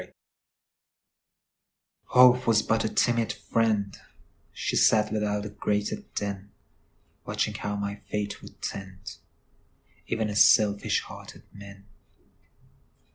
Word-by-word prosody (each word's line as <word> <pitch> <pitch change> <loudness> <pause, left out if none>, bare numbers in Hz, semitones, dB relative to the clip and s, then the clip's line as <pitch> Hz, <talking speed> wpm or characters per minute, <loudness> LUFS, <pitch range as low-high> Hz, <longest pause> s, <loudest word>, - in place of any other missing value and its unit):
Hope 125 0 +5
Was 110 -2 +4
but 110 0 +1
a 110 - -1
timid 115 -1 +1
friend; 105 -3 -1 0.6
She - - -3
sat 110 -1 +3
without 105 -1 -1
the 105 - -7
grated 105 0 -3
den, 100 -1 -4 0.7
Watching - - -2
how 105 0 -4
my 100 0 -4
fate 105 0 -3
would - - -15
tend, 95 +1 -7 0.9
Even 115 -2 -1
as 105 - +6
selfish 100 -1 +3
hearted - - -12
men. 100 0 -13
105 Hz, 105 wpm, -26 LUFS, 100-110 Hz, 0.9 s, as